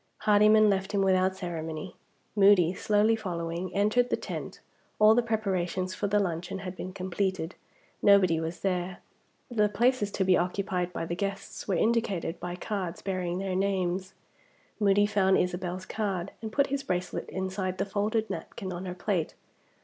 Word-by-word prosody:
Hardyman 215 +1 +6
left 195 0 0
him 200 - +2
without 190 0 +3
ceremony. 165 -1 -5 0.4
Moody, 195 -4 +5
slowly 210 +3 +2
following, 175 -3 -4
entered 215 +5 +3
the - - +1
tent. - - -6 0.4
All 215 +1 +7
the 245 - +4
preparations 185 -5 -1
for 205 +2 -2
the 205 +1 +2
luncheon 180 -1 -1
had 185 0 -5
been 185 - -6
completed; 185 -2 -2 0.5
nobody 185 -5 +5
was 165 +1 -4
there. 180 -1 -1 0.5
The 210 -3 +2
places 235 0 +2
to 195 - +1
be 185 -1 +4
occupied 180 0 -1
by 165 - -4
the 170 - -3
guests 195 +1 -4
were 195 - +1
indicated 205 -6 0
by 175 0 -4
cards 185 -2 -4
bearing 185 -2 -2
their 190 0 -2
names. 190 -1 -1 0.6
Moody 205 -1 +4
found 195 -2 +3
Isabel's 180 +1 -2
card, 195 -3 -2
and 220 -1 -5
put 280 +4 +3
his 280 - 0
bracelet 180 -9 -3
inside 190 0 -3
the 195 - 0
folded 215 +2 0
napkin 190 -4 -6
on 175 +2 -5
her 180 - -5
plate. 180 -3 -1
190 Hz, 160 wpm, -28 LUFS, 180-205 Hz, 0.6 s, All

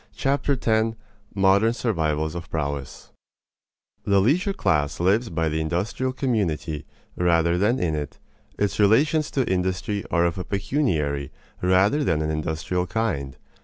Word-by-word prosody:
Chapter 140 +1 +1
Ten 110 -2 +1 0.2
~~ 105 -1 -32
Modern 100 +3 +4
Survivals 80 -10 -1
of 85 0 -7
Prowess 70 -3 -4 0.9
The 100 -1 +3
leisure 160 - +2
class 75 - 0
lives 105 +7 +2
by 80 -5 -1
the 80 +1 -1
industrial 90 +11 -1
community 95 - -2 0.3
rather 85 -1 +2
than 105 +7 +2
in 85 -7 0
it. 75 -2 -4 0.4
Its 105 0 -1
relations 145 +10 +3
to 130 -3 -1
industry 95 +3 -1
are 85 -1 +2
of 85 +1 -1
a - - -2
pecuniary 90 - -1 0.3
rather 95 +10 +3
than 80 - +1
an 75 - -1
industrial 80 +4 -2
kind. 70 - -2
95 Hz, 140 wpm, -24 LUFS, 80-115 Hz, 0.9 s, Modern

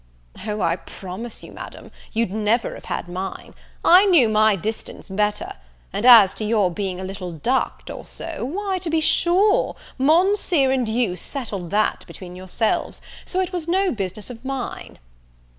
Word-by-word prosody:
"O, 210 0 -2
I 165 +1 +1
promise 190 +6 -8
you, - - -11
Madame, - - -10 0.2
you'd 225 -3 0
never 220 +3 0
have - - -11
had - - -4
mine; 185 +2 -6 0.3
I 365 +4 +8
knew 310 - +5
my 215 -1 +4
distance 215 +5 -5
better: 210 +2 -1 0.4
and 230 - +1
as 215 -6 +9
to 215 - -5
your 210 -4 +2
being 185 0 -3
a - - -5
little 190 -1 -5
ducked, 240 - -1
or - - -8
so, 330 -7 -5
why, 380 +8 -2
to 350 - -4
be 320 0 +2
sure, 365 +6 +3 0.2
Monseer 330 -1 +3
and 255 -4 0
you 220 -5 0
settled 200 - -3
that 215 +3 +1
between 180 -2 -10
yourselves; 185 +4 -1 0.3
so 375 - 0
it 370 0 -3
was 345 -3 -2
no 375 +2 +2
business 205 +1 -4
of 235 0 -11
mine." 270 -2 -5
225 Hz, 165 wpm, -22 LUFS, 195-315 Hz, 0.4 s, as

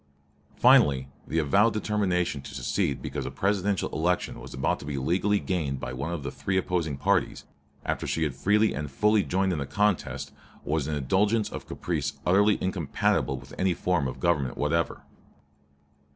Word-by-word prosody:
Finally, 65 -2 +5 0.2
the 80 - -2
avowed 100 +9 +3
determination 95 -8 0
to 65 - -10
secede - - -1
because 70 -3 -4
a - - -2
Presidential 100 +5 0
election 90 +3 -1
was - - -10
about 65 - -1
to - - -9
be 70 -1 -3
legally 95 +9 +1
gained 75 -8 -2
by - - -5
one 70 +6 -3
of 85 -5 -4
the - - -4
three 95 0 -2
opposing 85 -6 -1
parties, - - 0 0.4
after - - -2
she 80 - 0
had 75 -4 -1
freely 105 +10 +2
and 75 -1 -4
fully 105 +9 +3
joined 95 0 0
in 80 - -2
the 70 - -3
contest, 105 -2 0 0.3
was 75 -1 0
an 75 - -1
indulgence 100 - +1
of - - -7
caprice 75 -5 -2
utterly 100 +3 +4
incompatible 80 -6 0
with - - -12
any 90 -2 +2
form 90 -7 0
of 65 - -6
government 75 -8 0
whatever. 80 +3 0
85 Hz, 170 wpm, -27 LUFS, 70-95 Hz, 0.4 s, Finally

